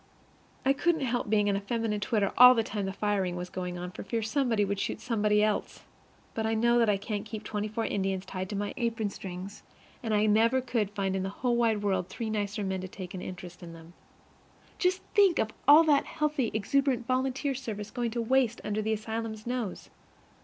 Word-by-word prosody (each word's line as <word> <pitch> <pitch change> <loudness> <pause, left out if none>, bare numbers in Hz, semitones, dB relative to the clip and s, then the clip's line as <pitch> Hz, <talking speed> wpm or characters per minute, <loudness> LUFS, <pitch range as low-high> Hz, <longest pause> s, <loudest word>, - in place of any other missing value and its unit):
I 270 - +5
couldn't 320 +2 +1
help 245 -4 -1
being 210 -1 +3
in 200 - +2
a 200 - -1
feminine 225 0 -1
twitter 205 -1 0
all 250 0 +9
the 225 - +2
time 205 -3 -3
the - - -2
firing 195 -3 -1
was 180 0 -6
going 180 -1 -4
on 180 0 -5
for - - -8
fear 225 +3 -2
somebody 225 -2 +1
would 200 0 -2
shoot - - -2
somebody 210 -3 +2
else. 215 -1 -1 0.5
But 220 0 -1
I 225 - +1
know 235 +2 +3
that 230 -2 +3
I 205 - +3
can't 205 +1 -4
keep 220 0 -7
twenty 210 0 -3
four 220 +2 -2
Indians 195 -1 -1
tied 185 0 -5
to 210 - -4
my 205 +1 -2
apron 230 -4 -1
strings, 190 +1 -8 0.4
and 225 - -3
I 210 0 +3
never 225 +4 +4
could 235 -5 -1
find 195 -2 -2
in 190 - -1
the 190 - -2
whole 240 +4 -1
wide 225 -3 +1
world 190 -3 0
three 225 -2 -4
nicer 205 0 -2
men 190 -1 -2
to 185 - -5
take 185 -1 -8
an 185 - -5
interest 180 -1 -8
in 170 -1 -9
them. 165 +1 -13 0.9
Just 365 +1 +1
think 395 -5 +5
of 220 - 0 0.2
all 300 +3 +9
that 295 -3 +3
healthy, 300 -6 -1
exuberant 255 +3 +1
volunteer 260 +2 0
service 215 -6 -6
going 240 -1 -1
to 235 +1 -2
waste 250 -1 +2
under 210 +1 -1
the 220 +1 0
asylum's 220 0 -4
nose! 240 -5 -4
215 Hz, 215 wpm, -29 LUFS, 200-240 Hz, 0.9 s, all